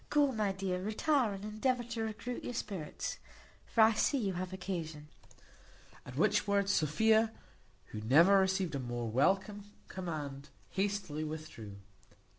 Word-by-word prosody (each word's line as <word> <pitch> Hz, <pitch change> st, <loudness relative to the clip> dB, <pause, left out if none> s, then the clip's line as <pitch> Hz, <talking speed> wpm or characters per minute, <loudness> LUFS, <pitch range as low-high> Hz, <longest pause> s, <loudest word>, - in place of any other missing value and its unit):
Go, 290 Hz, -2 st, +4 dB
my 215 Hz, -4 st, 0 dB
dear, 190 Hz, -1 st, -2 dB
retire, 230 Hz, +4 st, +1 dB
and 195 Hz, +1 st, -7 dB
endeavour 240 Hz, +4 st, 0 dB
to 230 Hz, -1 st, -4 dB
recruit 225 Hz, +3 st, -4 dB
your 245 Hz, -, -4 dB
spirits; 185 Hz, -9 st, -4 dB, 0.5 s
for 230 Hz, -, +2 dB
I 220 Hz, +1 st, +7 dB
see 280 Hz, +6 st, +2 dB
you 200 Hz, -7 st, -1 dB
have 180 Hz, +1 st, -4 dB
occasion." 165 Hz, -5 st, -5 dB, 1.0 s
At 125 Hz, -, -8 dB
which 210 Hz, +5 st, +3 dB
words 200 Hz, -1 st, +2 dB
Sophia, 220 Hz, +8 st, +3 dB, 0.6 s
who 105 Hz, -, -5 dB
never 165 Hz, -, +6 dB
received 190 Hz, -3 st, +1 dB
a 140 Hz, -, -1 dB
more 120 Hz, -2 st, -3 dB
welcome 190 Hz, -, +1 dB, 0.2 s
command, 150 Hz, -6 st, -5 dB, 0.2 s
hastily 195 Hz, -6 st, -1 dB
withdrew. 150 Hz, -10 st, -7 dB
195 Hz, 140 wpm, -33 LUFS, 155-215 Hz, 1.0 s, I